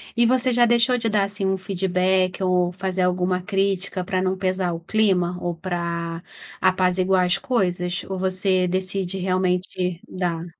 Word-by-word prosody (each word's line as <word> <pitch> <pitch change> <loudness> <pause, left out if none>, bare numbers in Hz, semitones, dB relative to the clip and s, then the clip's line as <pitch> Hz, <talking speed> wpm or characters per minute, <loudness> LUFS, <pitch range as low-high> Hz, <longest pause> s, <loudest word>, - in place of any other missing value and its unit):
E 235 0 +4
você 255 +1 +3
já 240 0 +4
deixou 240 +2 +3
de 230 -2 -1
dar, 210 -2 +2
assim, 200 +1 -4
um 190 0 +1
feedback 185 0 0
ou 180 -1 +2
fazer 190 0 -3
alguma 180 0 +1
crítica 195 0 -1
para 185 0 -1
não 185 0 0
pesar 185 -1 -1
o 165 - -4
clima 180 -2 +1
ou 175 -1 -2
para 170 -1 -4 0.4
apaziguar 185 0 +2
as 180 +2 +1
coisas? 180 -7 -1
Ou 190 -1 -4
você 185 0 +1
decide 185 +1 -2
realmente 180 -1 -1
dar? 175 -3 -3
185 Hz, 160 wpm, -23 LUFS, 180-195 Hz, 0.4 s, E